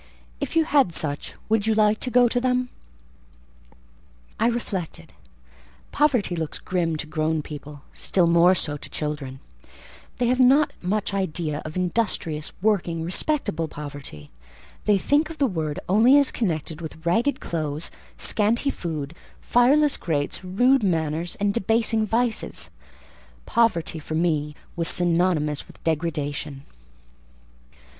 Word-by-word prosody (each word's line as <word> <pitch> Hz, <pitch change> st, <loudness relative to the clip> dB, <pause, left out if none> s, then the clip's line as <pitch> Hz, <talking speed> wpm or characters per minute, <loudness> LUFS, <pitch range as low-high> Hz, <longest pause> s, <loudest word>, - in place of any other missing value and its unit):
"If -, -, -4 dB
you 325 Hz, -, +5 dB
had 275 Hz, -, +3 dB
such, 145 Hz, -2 st, -2 dB
would 220 Hz, -1 st, +1 dB
you 220 Hz, -, +3 dB
like 215 Hz, 0 st, +3 dB
to 255 Hz, -, -2 dB
go 245 Hz, 0 st, +5 dB
to 245 Hz, +1 st, 0 dB
them?" 250 Hz, 0 st, +1 dB, 1.7 s
I 225 Hz, -, +3 dB
reflected. 190 Hz, -, -4 dB, 0.8 s
Poverty 255 Hz, -11 st, +2 dB
looks 160 Hz, -2 st, -3 dB
grim 170 Hz, -3 st, -1 dB
to 155 Hz, -, -4 dB
grown 155 Hz, 0 st, -1 dB
people; 145 Hz, -1 st, -9 dB
still 180 Hz, -3 st, +2 dB
more 170 Hz, +2 st, +5 dB
so 145 Hz, -4 st, -2 dB
to -, -, -8 dB
children: 145 Hz, -3 st, -5 dB, 0.8 s
they 245 Hz, -, +1 dB
have 250 Hz, +2 st, +1 dB
not 270 Hz, +4 st, +5 dB
much 200 Hz, +2 st, -1 dB
idea 165 Hz, -5 st, -2 dB
of 155 Hz, -, -7 dB
industrious, 180 Hz, -5 st, -1 dB
working, 175 Hz, -6 st, +1 dB
respectable 175 Hz, -, -1 dB
poverty; 145 Hz, -, -8 dB, 0.5 s
they 205 Hz, -1 st, +4 dB
think 290 Hz, +10 st, +1 dB
of 325 Hz, -, -8 dB
the 285 Hz, -, +2 dB
word 160 Hz, -, -2 dB
only 230 Hz, +9 st, +6 dB
as 280 Hz, -2 st, +4 dB
connected 160 Hz, -6 st, -2 dB
with 160 Hz, 0 st, -9 dB
ragged 230 Hz, +12 st, +1 dB
clothes, 155 Hz, -1 st, -3 dB, 0.3 s
scanty 230 Hz, +6 st, +1 dB
food, 155 Hz, -, -5 dB, 0.3 s
fireless 280 Hz, +5 st, +3 dB
grates, 150 Hz, +1 st, -2 dB
rude 245 Hz, +9 st, +3 dB
manners, 165 Hz, -3 st, -1 dB
and 200 Hz, 0 st, 0 dB
debasing 225 Hz, 0 st, +1 dB
vices: 230 Hz, +1 st, -1 dB, 0.7 s
poverty 175 Hz, -9 st, +1 dB
for 155 Hz, +1 st, -5 dB
me 155 Hz, -3 st, 0 dB, 0.2 s
was 165 Hz, -2 st, -1 dB
synonymous 170 Hz, -5 st, +2 dB
with -, -, -17 dB
degradation. 150 Hz, -3 st, -2 dB
175 Hz, 130 wpm, -24 LUFS, 155-230 Hz, 1.7 s, only